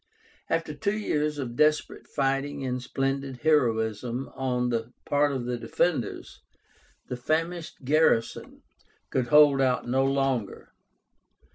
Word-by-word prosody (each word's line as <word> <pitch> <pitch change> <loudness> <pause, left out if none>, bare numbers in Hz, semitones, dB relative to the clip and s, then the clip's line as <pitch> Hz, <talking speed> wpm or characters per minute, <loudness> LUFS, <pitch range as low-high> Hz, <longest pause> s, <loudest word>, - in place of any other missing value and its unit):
After 165 -2 -1
two 200 +9 -1
years 150 -7 -1
of 125 -4 -5
desperate 150 +3 +1
fighting 135 0 -1
and 125 0 -2
splendid 135 0 -3
heroism 120 -4 +1
on 125 -2 -1
the 115 0 -3
part 145 0 +2
of 130 -3 -3
the 125 -1 -3
defenders, 150 - -2 0.7
the 125 - -4
famished 160 +3 -2
garrison 140 -5 +1 0.5
could 125 -2 0
hold 145 -2 +6
out 125 -2 +1
no 130 +2 +2
longer. 135 -6 -1
135 Hz, 120 wpm, -27 LUFS, 125-150 Hz, 0.7 s, hold